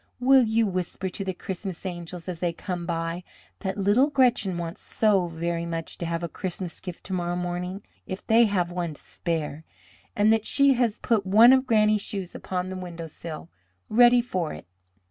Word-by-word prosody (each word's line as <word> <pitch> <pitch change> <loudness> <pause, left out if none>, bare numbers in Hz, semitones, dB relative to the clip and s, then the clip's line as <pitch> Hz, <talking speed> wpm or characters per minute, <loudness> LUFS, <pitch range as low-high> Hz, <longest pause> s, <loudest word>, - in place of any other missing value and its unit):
Will 265 +1 +6
you 225 +1 +2
whisper 185 -1 -3
to 195 - -5
the 190 - -2
Christmas 190 0 -6
angels 175 -1 -6
as 180 -3 -4
they 175 -1 0
come 175 0 -5
by 165 +1 -2 0.4
that 190 0 -3
little 205 +8 +3
Gretchen 245 -10 +2
wants 170 +3 -5
so 200 -5 +2
very 170 0 -3
much 165 -1 -4
to 170 - -3
have 170 +1 -2
a - - -1
Christmas 180 +1 -5
gift 180 -2 -8
to 190 - -6
morrow 175 -1 -1
morning, 180 +2 -4 0.2
if 185 0 -6
they 230 +1 +5
have 180 -4 0
one 175 -3 -3
to - - -19
spare, 160 -2 -4 0.5
and 210 +2 +4
that 225 -1 0
she 280 -1 +5
has 235 -4 +1
put 225 -4 +1
one 225 +6 +8
of 260 0 +3
Granny's 215 -2 +3
shoes 195 -3 -5
upon 185 0 -4
the 190 - -5
windowsill 170 -2 -8 0.4
ready 240 +2 +6
for 185 -9 -2
it?" 75 - -10
185 Hz, 185 wpm, -26 LUFS, 170-215 Hz, 0.5 s, one